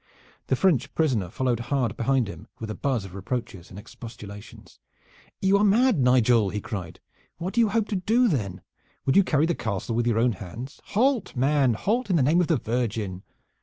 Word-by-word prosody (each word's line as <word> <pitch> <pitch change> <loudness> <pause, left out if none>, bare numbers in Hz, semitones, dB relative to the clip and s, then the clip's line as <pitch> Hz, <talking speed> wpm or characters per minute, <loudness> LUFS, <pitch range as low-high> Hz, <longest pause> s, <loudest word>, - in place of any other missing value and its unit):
The 130 - +2
French 145 -4 +2
prisoner 125 - +1
followed 125 +2 -1
hard 130 -6 0
behind 130 -1 +1
him, 100 - -9
with 110 -1 -5
a - - -3
buzz 125 -4 -1
of 95 - -11
reproaches 100 -2 -5
and 95 - -11
expostulations. 105 -1 -11 0.6
"You 195 +1 +4
are - - +3
mad, 215 - +4
Nigel!" 125 -4 +4
he 105 - -3
cried. 95 -5 -6 0.4
"What 175 +3 -4
do 235 - +3
you 225 - +3
hope 220 +1 0
to 210 - -1
do 225 +7 +2
then? 105 - -2 0.4
Would 135 - +2
you 200 - +7
carry 155 -4 +2
the 170 - +1
castle 110 - -3
with 120 +1 0
your 115 -2 +2
own 120 +2 +3
hands? 110 - -8
Halt, 245 -2 +2
man, 135 -1 +2
halt, 225 - -1
in 185 - +2
the 150 - +3
name 160 +7 +4
of 175 - 0
the 165 - +2
Virgin!" 110 -6 -2
125 Hz, 200 wpm, -25 LUFS, 110-175 Hz, 0.6 s, you